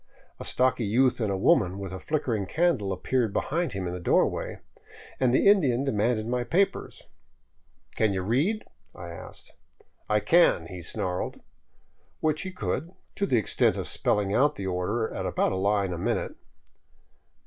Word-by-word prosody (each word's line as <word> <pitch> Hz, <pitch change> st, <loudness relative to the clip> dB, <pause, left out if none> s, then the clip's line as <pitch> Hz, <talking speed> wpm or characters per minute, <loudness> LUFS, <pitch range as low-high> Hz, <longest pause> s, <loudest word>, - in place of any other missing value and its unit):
A -, -, -6 dB
stocky 130 Hz, -1 st, +1 dB
youth 125 Hz, +5 st, +2 dB
and 105 Hz, -3 st, 0 dB
a 95 Hz, -, -1 dB
woman 95 Hz, -1 st, +3 dB
with 100 Hz, -2 st, -6 dB
a 95 Hz, -, -5 dB
flickering 120 Hz, -, -1 dB
candle 155 Hz, -, +1 dB
appeared 115 Hz, +4 st, 0 dB
behind 165 Hz, -, -1 dB
him 95 Hz, -2 st, -3 dB
in 90 Hz, -, -3 dB
the 90 Hz, -, -5 dB
doorway, 85 Hz, -, +1 dB, 0.6 s
and 130 Hz, -2 st, +3 dB
the 130 Hz, -, +3 dB
Indian 140 Hz, -11 st, +4 dB
demanded 110 Hz, -3 st, 0 dB
my 125 Hz, +1 st, -1 dB
papers. 175 Hz, -, -1 dB, 0.4 s
" -, -, -32 dB
Can 110 Hz, -2 st, +3 dB
you 95 Hz, -1 st, -2 dB
read? 150 Hz, -, +1 dB, 0.2 s
" -, -, -45 dB
I 85 Hz, 0 st, -8 dB
asked. 85 Hz, -, -10 dB, 0.3 s
" -, -, -43 dB
I 105 Hz, 0 st, +3 dB
can," 165 Hz, -, +4 dB
he 90 Hz, +1 st, -8 dB
snarled; 90 Hz, +2 st, -3 dB, 0.8 s
which 155 Hz, -1 st, 0 dB
he 190 Hz, -, -5 dB
could, 170 Hz, -3 st, -3 dB, 0.2 s
to 200 Hz, -, -1 dB
the 125 Hz, -, +2 dB
extent 110 Hz, -, +2 dB
of -, -, -4 dB
spelling 100 Hz, -1 st, 0 dB
out 145 Hz, +6 st, +3 dB
the 100 Hz, -, -5 dB
order 95 Hz, +5 st, -1 dB
at -, -, -3 dB
about -, -, +1 dB
a -, -, -1 dB
line 100 Hz, -1 st, +1 dB
a 85 Hz, -, -5 dB
minute. -, -, -1 dB
110 Hz, 175 wpm, -27 LUFS, 95-135 Hz, 0.8 s, Indian